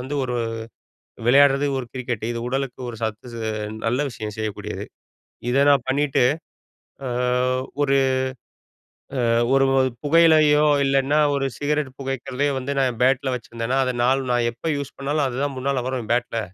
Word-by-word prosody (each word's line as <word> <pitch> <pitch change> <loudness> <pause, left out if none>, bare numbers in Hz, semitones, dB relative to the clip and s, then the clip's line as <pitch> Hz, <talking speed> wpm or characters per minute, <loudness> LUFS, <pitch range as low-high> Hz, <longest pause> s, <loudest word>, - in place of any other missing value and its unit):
வந்து 130 +3 -5
ஒரு 125 -1 -2 0.9
விளையாடுறது 140 +2 +5
ஒரு 125 - -5
கிரிக்கெட் 120 -4 -3
இது 115 - -4
உடலுக்கு 135 -1 -3
ஒரு 115 - -6
சத்து 110 +2 -4
ஸ் - - -6 0.5
நல்ல 125 +4 +1
விஷயம் 105 -3 -6
செய்யக்கூடியது. 110 -2 -4 0.7
இதை 135 +3 +3
நான் 140 -3 +4
பண்ணிட்டு, 140 0 +1 0.9
அ - - -2 0.7
ஒரு 140 -1 +3 1.3
அ - - +2 0.2
ஒரு 135 0 +4
ஒரு 130 0 +3
புகையிலையோ 155 -1 +5 0.2
இல்லைனா 135 +2 +2 0.2
ஒரு 135 -1 0
சிகரெட் 145 -2 -1
புகைக்கிறதையே 135 +1 -2
வந்து 130 +2 -3
நான் 135 -1 +3
என் 115 - -11
பேட்ல 130 0 +2
வச்சிருந்தேனா, 115 +2 -3
அதை 125 -1 -1
நாள் 130 +2 +3
நான் 120 -1 +2
எப்போ 120 +8 -5
யூஸ் 140 -1 -6
பண்ணாலும். 145 +1 0
அதுதான் 135 +2 -2
முன்னால 130 -1 -1
வரும் 125 -4 -4
பேட்ல 120 -1 -1
130 Hz, 150 wpm, -22 LUFS, 125-140 Hz, 1.3 s, விளையாடுறது